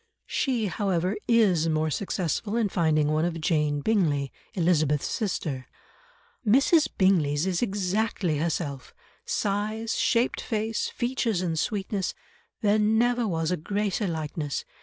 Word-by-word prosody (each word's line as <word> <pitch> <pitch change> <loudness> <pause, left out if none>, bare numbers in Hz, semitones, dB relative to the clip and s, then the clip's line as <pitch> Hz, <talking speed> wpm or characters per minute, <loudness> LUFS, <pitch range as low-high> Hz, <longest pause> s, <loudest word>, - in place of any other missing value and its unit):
She, 250 -6 0
however, 190 0 0
is 195 -9 +3
more 155 0 0
successful 190 - -2
in 220 -3 +1
finding 155 -4 +2
one 155 +1 +1
of 170 -1 -1
Jane 150 -3 +1
Bingley, 150 -9 +1 0.2
Elizabeth's 155 -5 +2
sister, 155 - -3 0.8
"Mrs. 275 +8 +4
Bingley's 165 -6 +3
is 185 -2 0
exactly 195 -5 0
herself—size, 200 - -3
shaped 235 +1 +1
face, 220 -1 -2
features 240 -6 -1
and 165 -3 -1
sweetness; 200 -1 -2 0.5
there 210 0 +3
never 230 +3 +2
was 165 -2 -1
a 180 - +1
greater 205 +4 -1
likeness. 155 -3 -3
185 Hz, 115 wpm, -26 LUFS, 155-215 Hz, 0.8 s, Mrs